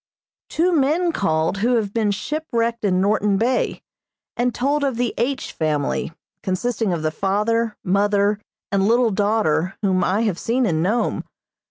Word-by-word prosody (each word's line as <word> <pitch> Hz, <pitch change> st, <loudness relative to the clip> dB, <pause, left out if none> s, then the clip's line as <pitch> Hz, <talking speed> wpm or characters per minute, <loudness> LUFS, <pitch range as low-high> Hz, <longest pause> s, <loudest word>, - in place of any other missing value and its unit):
Two 350 Hz, +3 st, +1 dB
men 330 Hz, +3 st, +2 dB
called 160 Hz, -, 0 dB
who 240 Hz, +5 st, +2 dB
have 210 Hz, -3 st, -1 dB
been 220 Hz, -3 st, +1 dB
shipwrecked 235 Hz, +1 st, -2 dB
in 185 Hz, -2 st, +2 dB
Norton 205 Hz, 0 st, +2 dB
Bay, 245 Hz, +4 st, 0 dB, 0.5 s
and 245 Hz, +1 st, +1 dB
told 285 Hz, +4 st, 0 dB
of 270 Hz, -4 st, 0 dB
the 245 Hz, -1 st, 0 dB
H. 260 Hz, +4 st, -2 dB
family, 155 Hz, 0 st, -1 dB, 0.3 s
consisting 220 Hz, +2 st, -1 dB
of 165 Hz, -3 st, -2 dB
the 155 Hz, -, 0 dB
father, 210 Hz, +6 st, 0 dB
mother, 200 Hz, +2 st, +2 dB, 0.3 s
and 200 Hz, 0 st, +2 dB
little 235 Hz, 0 st, +3 dB
daughter 195 Hz, -4 st, +1 dB
whom 185 Hz, -2 st, +2 dB
I 195 Hz, +5 st, +1 dB
have 210 Hz, -6 st, 0 dB
seen 245 Hz, +2 st, +1 dB
in 160 Hz, -6 st, +1 dB
Nome. 210 Hz, +8 st, 0 dB
210 Hz, 155 wpm, -21 LUFS, 190-240 Hz, 0.5 s, little